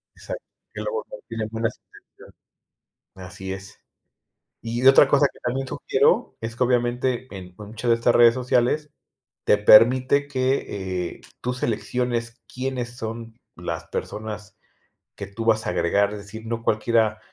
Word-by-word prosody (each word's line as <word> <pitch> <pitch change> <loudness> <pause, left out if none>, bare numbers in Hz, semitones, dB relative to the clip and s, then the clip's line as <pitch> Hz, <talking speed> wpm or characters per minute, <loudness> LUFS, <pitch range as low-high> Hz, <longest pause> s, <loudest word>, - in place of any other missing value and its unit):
Exacto, - - -7 0.3
que - - -5
el - - -5
abogado 485 +1 -5
tiene 110 -1 -3
buenas 115 0 -2
intenciones. - - -19 0.8
Así 95 +1 -7
es. 95 0 -10 0.8
Y 120 +2 -3
otra 135 +1 +8
cosa 145 0 +4
que - - -20
también 130 +2 -2
sugiero - - +1
es 115 +1 -5
que 125 - +1
obviamente 125 +1 0
en 90 -1 -9
muchas 110 +3 -5
de 115 - +6
estas 120 +1 +2
redes 120 -1 +7
sociales 130 +4 +1 0.5
te 105 - +4
permite 130 +7 +6
que, 100 -9 -2
eh, - - -23 0.2
tú 125 0 -2
selecciones 120 -1 -2
quiénes 125 -2 -4
son 115 0 -7 0.2
las - - -5
personas 105 -1 -6 0.6
que 100 - -7
tú 115 +3 -6
vas 110 -1 +2
a - - 0
agregar, 100 +4 +1
es 105 - -6
decir, 110 +3 -10
no 115 0 -4
cualquiera 110 0 +1
115 Hz, 150 wpm, -24 LUFS, 105-125 Hz, 0.8 s, otra